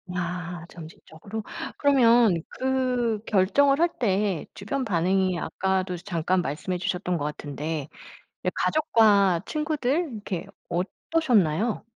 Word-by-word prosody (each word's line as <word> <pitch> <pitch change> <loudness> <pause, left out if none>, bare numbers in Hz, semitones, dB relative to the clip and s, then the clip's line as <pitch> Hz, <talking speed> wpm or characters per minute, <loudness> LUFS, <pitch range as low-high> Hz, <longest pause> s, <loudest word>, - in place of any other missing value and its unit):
야 175 -1 -4
점진적으로. 170 +5 -9 0.3
그러면 235 - +4
그 255 -4 0
결정을 275 +9 +3
할 340 +1 +4
때 200 -6 0
주변 255 +7 -3
반응이 185 0 +1
아까도 190 -1 -1
이제 175 - -10
잠깐 180 -1 0
말씀해 175 +4 -3
주셨던 180 0 -2
것 145 - -3
같은데 150 0 -4 0.6
이 - - +3
가족과 210 - +3
친구들 300 +1 -1
이렇게 205 -5 -5 0.2
어떠셨나요? 210 - +1
195 Hz, 260 characters per minute, -25 LUFS, 175-245 Hz, 0.6 s, 그러면